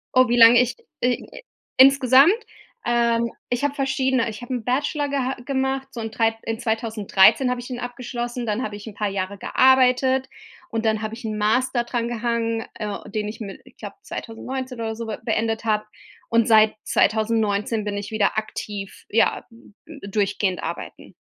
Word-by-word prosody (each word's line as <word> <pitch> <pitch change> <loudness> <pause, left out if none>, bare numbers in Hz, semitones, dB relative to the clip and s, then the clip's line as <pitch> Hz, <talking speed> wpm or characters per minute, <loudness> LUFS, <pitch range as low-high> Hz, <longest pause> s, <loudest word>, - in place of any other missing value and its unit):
Oh, 255 0 +6
wie 240 - +2
lange 235 +1 +8
ich 250 - -1 0.3
i 250 - -2 0.4
insgesamt? 270 +3 +7 0.5
Ähm, 235 -1 +1 0.2
ich 245 +2 -1
habe 285 -1 +1
verschiedene 265 -3 0
ich 215 +1 -8
habe 245 - -5
'n 245 -3 -3
Bachelor 285 +4 0
geha 270 -2 -1
gemacht, 265 0 -1
so 240 -3 -6
in 225 -1 -5
3 225 0 +1
in 225 -1 -3
2013 220 +1 +3
habe 250 - -1
ich 245 - -9
den 250 -2 -5
abgeschlossen, 245 0 -5
dann 215 +2 -1
habe 210 -3 -4
ich 205 - -10
'n 220 - -7
paar 210 +1 -2
Jahre 195 0 -3
gearbeitet, 260 +1 +3 0.4
und 225 0 -3
dann 220 -1 +1
habe 215 0 -4
ich 245 - -12
'n 215 -1 -3
Master 240 +4 +1
dran 240 -1 -2
gehangen, 230 -1 -1
äh, 210 -1 -5
den 210 0 -3
ich 210 - -7
mi 200 -4 -7
ich - - -19
glaube - - -8
2019 255 +2 -6
oder 220 -1 -3
so 230 0 -6
be 215 - -5
beendet 225 0 -1
habe, 215 -1 +1 0.4
und 230 -1 +3
seit 220 -1 +5
2019 215 -1 +1
bin 205 -1 -3
ich 205 +1 -6
wieder 215 -1 +1
aktiv, 205 -2 -5
ja, 225 - +2
äh, - - -21 0.4
d 285 -9 -10
durchgehend 200 -2 0
arbeiten. 170 +1 -7
230 Hz, 180 wpm, -23 LUFS, 215-255 Hz, 0.5 s, lange